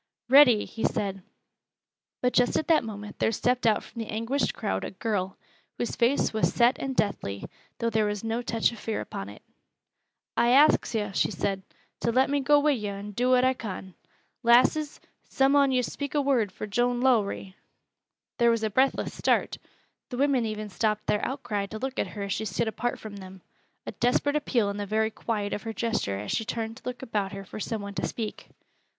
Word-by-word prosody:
"Ready!" 255 Hz, -5 st, +7 dB
he 225 Hz, -, -7 dB
said. 195 Hz, -1 st, -1 dB, 1.0 s
But 250 Hz, -, +2 dB
just 245 Hz, 0 st, +3 dB
at 315 Hz, -, -1 dB
that 320 Hz, -, +5 dB
moment 210 Hz, -2 st, -8 dB
there -, -, +2 dB
stepped 245 Hz, +2 st, +1 dB
out 215 Hz, -, +3 dB
from 230 Hz, -, -8 dB
the 225 Hz, -, -6 dB
anguished 230 Hz, +6 st, -1 dB
crowd 95 Hz, 0 st, -2 dB
a -, -, -3 dB
girl, 195 Hz, -2 st, -2 dB, 0.4 s
whose 240 Hz, -, -2 dB
face 240 Hz, +2 st, +2 dB
was 220 Hz, -, +2 dB
set 240 Hz, +2 st, +4 dB
and 270 Hz, -1 st, -3 dB
deathly, 100 Hz, -, -1 dB, 0.3 s
though 230 Hz, -1 st, -1 dB
there 215 Hz, -1 st, +2 dB
was 205 Hz, 0 st, -3 dB
no 225 Hz, +1 st, -1 dB
touch 230 Hz, -2 st, +1 dB
of 235 Hz, -, -10 dB
fear 220 Hz, 0 st, -3 dB
upon 100 Hz, +1 st, -6 dB
it. 105 Hz, -, -13 dB, 0.9 s
"I 240 Hz, +1 st, +3 dB
ax 285 Hz, -3 st, +5 dB
yo'," 210 Hz, -2 st, -1 dB
she -, -, +1 dB
said, 195 Hz, 0 st, -2 dB, 0.4 s
"to 235 Hz, -, 0 dB
let 260 Hz, +3 st, +3 dB
me 285 Hz, -, +2 dB
go 290 Hz, +2 st, +4 dB
wi' 295 Hz, +1 st, +3 dB
yo' 210 Hz, -7 st, -2 dB
and 205 Hz, 0 st, -8 dB
do 250 Hz, +3 st, +1 dB
what 255 Hz, 0 st, +5 dB
I 260 Hz, -, +4 dB
con. 190 Hz, -6 st, -7 dB, 0.5 s
Lasses, 255 Hz, +5 st, +4 dB, 0.3 s
some 270 Hz, +1 st, +3 dB
on 280 Hz, -1 st, +5 dB
yo' 255 Hz, -1 st, +2 dB
speak 285 Hz, +4 st, -5 dB
a -, -, +4 dB
word 245 Hz, -8 st, +2 dB
for 200 Hz, -, -6 dB
Joan 240 Hz, +4 st, 0 dB
Lowrie!" 215 Hz, -6 st, +1 dB, 0.8 s
There 235 Hz, 0 st, +5 dB
was 230 Hz, -1 st, +1 dB
a 215 Hz, -, 0 dB
breathless 260 Hz, +5 st, +1 dB
start. -, -, 0 dB, 0.5 s
The 250 Hz, -, -5 dB
women 270 Hz, -4 st, +2 dB
even 215 Hz, -1 st, -4 dB
stopped 210 Hz, +1 st, -1 dB
their 210 Hz, -, 0 dB
outcry 230 Hz, -7 st, -2 dB
to 220 Hz, -, -7 dB
look 265 Hz, +3 st, -4 dB
at -, -, 0 dB
her 200 Hz, -, -3 dB
as 200 Hz, -1 st, -2 dB
she 220 Hz, -, -3 dB
stood 225 Hz, +2 st, -1 dB
apart 240 Hz, +2 st, -2 dB
from 210 Hz, -2 st, -9 dB
them, 190 Hz, -1 st, -11 dB, 0.4 s
a -, -, -4 dB
desperate 265 Hz, +4 st, +1 dB
appeal 240 Hz, -8 st, +1 dB
in 200 Hz, -, -6 dB
the 205 Hz, -1 st, -4 dB
very 220 Hz, +2 st, +1 dB
quiet 210 Hz, -2 st, -3 dB
of -, -, -3 dB
her 225 Hz, -, -5 dB
gesture 220 Hz, -, -1 dB
as 105 Hz, +1 st, -5 dB
she -, -, 0 dB
turned 225 Hz, 0 st, -4 dB
to -, -, -16 dB
look 250 Hz, +1 st, -5 dB
about 205 Hz, -5 st, -2 dB
her 195 Hz, 0 st, -7 dB
for 200 Hz, -, -8 dB
some 215 Hz, 0 st, -3 dB
one 200 Hz, 0 st, -6 dB
to -, -, -2 dB
speak. 220 Hz, -3 st, -5 dB
225 Hz, 210 wpm, -27 LUFS, 205-250 Hz, 1.0 s, Ready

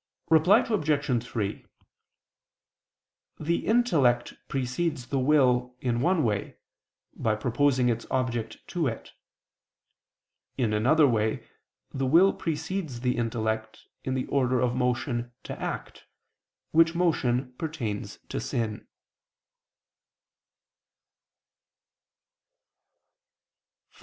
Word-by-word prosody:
Reply 170 Hz, +7 st, +6 dB
Obj. 150 Hz, -, +1 dB
3: 110 Hz, -4 st, -3 dB, 1.8 s
The 165 Hz, +2 st, -1 dB
intellect 150 Hz, -, +3 dB
precedes 135 Hz, +2 st, -2 dB
the 135 Hz, -, 0 dB
will, 125 Hz, -3 st, +3 dB
in 120 Hz, -2 st, -1 dB
one 175 Hz, +2 st, +2 dB
way, 105 Hz, -4 st, -2 dB, 0.6 s
by 110 Hz, -1 st, 0 dB
proposing 125 Hz, +3 st, +2 dB
its 115 Hz, -1 st, -1 dB
object 120 Hz, -4 st, -2 dB
to 170 Hz, -5 st, 0 dB
it. 115 Hz, -3 st, -5 dB, 1.5 s
In 115 Hz, -5 st, +1 dB
another 140 Hz, +8 st, +4 dB
way, 110 Hz, -3 st, 0 dB, 0.5 s
the 135 Hz, -1 st, -1 dB
will 175 Hz, +8 st, +6 dB
precedes 160 Hz, -4 st, -3 dB
the 125 Hz, -1 st, +1 dB
intellect, 110 Hz, -2 st, -2 dB, 0.2 s
in 130 Hz, -, -2 dB
the 130 Hz, -, -1 dB
order 130 Hz, -2 st, +1 dB
of 125 Hz, -1 st, +1 dB
motion 125 Hz, -1 st, -1 dB
to -, -, -7 dB
act, -, -, -5 dB, 0.6 s
which 165 Hz, +1 st, +4 dB
motion 130 Hz, -7 st, +1 dB
pertains 135 Hz, -11 st, -4 dB
to -, -, -3 dB
sin. 110 Hz, -3 st, -3 dB
130 Hz, 90 wpm, -27 LUFS, 120-155 Hz, 1.8 s, Reply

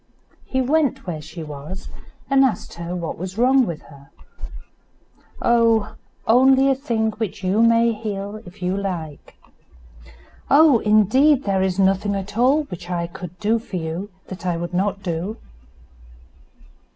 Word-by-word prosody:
He 260 Hz, -, -1 dB
went 285 Hz, +1 st, +1 dB
where 165 Hz, -4 st, -4 dB
she 160 Hz, +2 st, -9 dB
was, 150 Hz, +5 st, -8 dB, 0.4 s
and 275 Hz, -1 st, +4 dB
asked 240 Hz, -8 st, -1 dB
her 170 Hz, +1 st, -5 dB
what 170 Hz, -3 st, -5 dB
was 185 Hz, +2 st, -6 dB
wrong 255 Hz, +1 st, +4 dB
with 165 Hz, -3 st, -6 dB
her. 140 Hz, -2 st, -16 dB, 1.3 s
"Oh! 230 Hz, -2 st, +2 dB, 0.3 s
only 265 Hz, +3 st, +5 dB
a -, -, +4 dB
thing 230 Hz, -5 st, -1 dB
which 210 Hz, -3 st, -5 dB
you 190 Hz, +4 st, +2 dB
may 230 Hz, 0 st, +4 dB
heal 210 Hz, -1 st, -5 dB
if 180 Hz, -2 st, -12 dB
you 180 Hz, +1 st, 0 dB
like." 175 Hz, -7 st, -5 dB, 1.1 s
"Oh! 285 Hz, -3 st, +6 dB
indeed 250 Hz, +8 st, +4 dB
there 195 Hz, -2 st, 0 dB
is 190 Hz, -1 st, 0 dB
nothing 195 Hz, +1 st, +2 dB
at 195 Hz, +1 st, -5 dB
all 265 Hz, +6 st, +3 dB
which 180 Hz, -, -9 dB
I 175 Hz, -1 st, -1 dB
could 180 Hz, 0 st, -9 dB
do 220 Hz, +2 st, +1 dB
for 220 Hz, -, -9 dB
you 170 Hz, +4 st, -4 dB, 0.2 s
that 185 Hz, -2 st, -8 dB
I 175 Hz, -2 st, -1 dB
would 175 Hz, +1 st, -5 dB
not 195 Hz, +2 st, -1 dB
do." 180 Hz, +5 st, -3 dB
200 Hz, 150 wpm, -21 LUFS, 180-230 Hz, 1.3 s, Oh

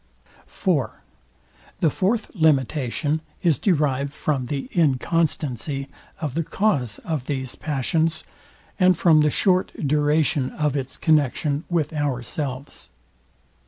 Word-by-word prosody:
IV. 160 Hz, -10 st, 0 dB, 0.9 s
The 160 Hz, -, +3 dB
fourth 210 Hz, -, 0 dB
limitation 150 Hz, -, +1 dB, 0.2 s
is 165 Hz, -6 st, +3 dB
derived 140 Hz, -7 st, +1 dB
from 140 Hz, -3 st, -2 dB
the 140 Hz, +1 st, -3 dB
inconstancy 145 Hz, -3 st, 0 dB, 0.3 s
of 150 Hz, -6 st, -3 dB
the 165 Hz, +3 st, 0 dB
cause 150 Hz, -, 0 dB
of 150 Hz, -6 st, -3 dB
these 130 Hz, -3 st, -3 dB
passions, 155 Hz, +3 st, -1 dB, 0.6 s
and 185 Hz, -2 st, +5 dB
from 165 Hz, -3 st, +5 dB
the 150 Hz, -, +4 dB
short 185 Hz, +3 st, +2 dB
duration 150 Hz, -1 st, +2 dB
of 150 Hz, -2 st, 0 dB
its 135 Hz, -2 st, -3 dB
connexion 150 Hz, 0 st, +1 dB
with 160 Hz, -3 st, 0 dB
ourselves. 140 Hz, -1 st, -3 dB
150 Hz, 110 wpm, -23 LUFS, 135-160 Hz, 0.9 s, and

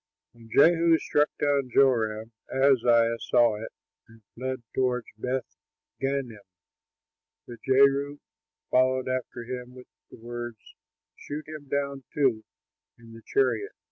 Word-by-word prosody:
When 115 Hz, -1 st, -17 dB
Jehu 165 Hz, +4 st, +5 dB
struck 150 Hz, -1 st, +1 dB
down 140 Hz, -3 st, +1 dB
Joram, 115 Hz, -4 st, +2 dB, 0.2 s
Ahaziah 120 Hz, -4 st, +3 dB
saw 120 Hz, -3 st, +3 dB
it 115 Hz, -, -7 dB, 0.4 s
and 115 Hz, -1 st, -19 dB
fled 130 Hz, 0 st, -4 dB
toward 125 Hz, -2 st, 0 dB
Beth 125 Hz, +3 st, -2 dB, 0.6 s
gannim. 135 Hz, -5 st, -2 dB, 1.1 s
But 120 Hz, -, -10 dB
Jehu 140 Hz, +2 st, +3 dB, 0.5 s
followed 130 Hz, 0 st, +2 dB
after 130 Hz, -2 st, -3 dB
him 125 Hz, +1 st, -7 dB
with 125 Hz, -1 st, -12 dB, 0.2 s
the -, -, -13 dB
words, 120 Hz, 0 st, -7 dB, 0.6 s
"Shoot 150 Hz, +1 st, -7 dB
him 155 Hz, -2 st, -9 dB
down, 140 Hz, -1 st, -2 dB
too, 130 Hz, -7 st, +2 dB, 0.5 s
in 115 Hz, -1 st, -15 dB
the 115 Hz, -, -12 dB
chariot." 410 Hz, 0 st, 0 dB
130 Hz, 120 wpm, -27 LUFS, 115-140 Hz, 1.1 s, Jehu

